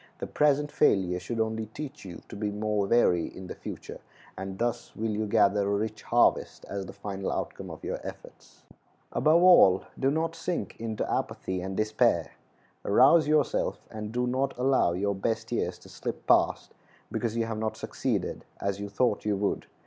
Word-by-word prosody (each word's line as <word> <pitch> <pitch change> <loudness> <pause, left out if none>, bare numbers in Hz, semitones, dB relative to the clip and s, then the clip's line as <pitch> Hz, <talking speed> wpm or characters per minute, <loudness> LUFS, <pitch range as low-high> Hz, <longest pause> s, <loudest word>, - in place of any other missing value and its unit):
The - - -4
present 145 0 +2
failure 90 -9 +2
should 115 +6 -5
only 110 0 -1
teach 145 +3 -8
you 90 -3 -9
to - - -9
be 105 0 -2
more 105 -1 -1
wary 90 -7 +3
in 95 - -9
the - - -6
future, - - -8 0.4
and 95 0 -6
thus 120 +1 -2
will 110 0 -2
you 105 +1 -1
gather 100 -2 +3
a 100 - +1
rich 110 +1 -3
harvest - - +2
as 100 -2 -4
the - - -7
final 100 -1 -4
outcome - - -4
of - - -9
your - - -3
efforts. - - -11 0.5
Above 165 +3 +4
all, 95 - +7 0.2
do 135 - +3
not 160 +3 -1
sink 170 +1 -3
into 110 -1 -3
apathy 95 -1 -2
and 95 +1 -5
despair. 110 0 +2 0.5
Rouse 140 +10 +5
yourself, 150 -2 +1
and 105 -1 -6
do 125 +1 0
not 130 +2 -1
allow 130 -8 +3
your 100 +3 0
best 100 +3 -2
years - - -1
to - - -16
slip - - -6
past - - +2 0.4
because 115 -1 -2
you 115 - +1
have 110 -1 -4
not 110 0 -2
succeeded - - -2 0.2
as 100 0 -2
you 100 0 -5
thought 105 +1 +1
you 105 -1 +1
would. 100 +1 -1
110 Hz, 180 wpm, -28 LUFS, 100-125 Hz, 0.5 s, all